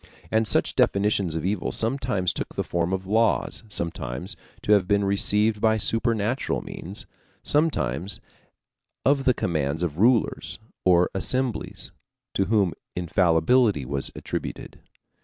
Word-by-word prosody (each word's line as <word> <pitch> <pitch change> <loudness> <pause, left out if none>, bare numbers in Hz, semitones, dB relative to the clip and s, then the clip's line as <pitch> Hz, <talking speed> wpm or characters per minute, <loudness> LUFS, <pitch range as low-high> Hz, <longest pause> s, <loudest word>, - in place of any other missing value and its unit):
And 110 0 +2
such - - +2
definitions 100 -4 +2
of 80 - -2
evil 100 0 -1
sometimes 115 -6 0
took - - -5
the - - -1
form 85 +1 -1
of 95 0 -2
laws, 110 +4 +1
supposed 80 -10 -3 0.3
to - - 0
have 100 -3 +5
been 100 0 +2
received 105 +2 +2
by 110 0 +3
supernatural 115 +2 0
means, 95 +5 -7 0.4
sometimes 100 - +1 0.9
of 135 0 +3
the 130 -3 +4
commands 80 -1 -1
of 80 -2 -3
rulers 115 +1 +2 0.3
or 90 -1 +4
assemblies 125 +5 -1 0.4
to 95 - +1
whom 100 -4 +2 0.2
infallibility 90 - +2
was 70 +1 0
attributed. - - -6
100 Hz, 125 wpm, -25 LUFS, 85-115 Hz, 0.9 s, have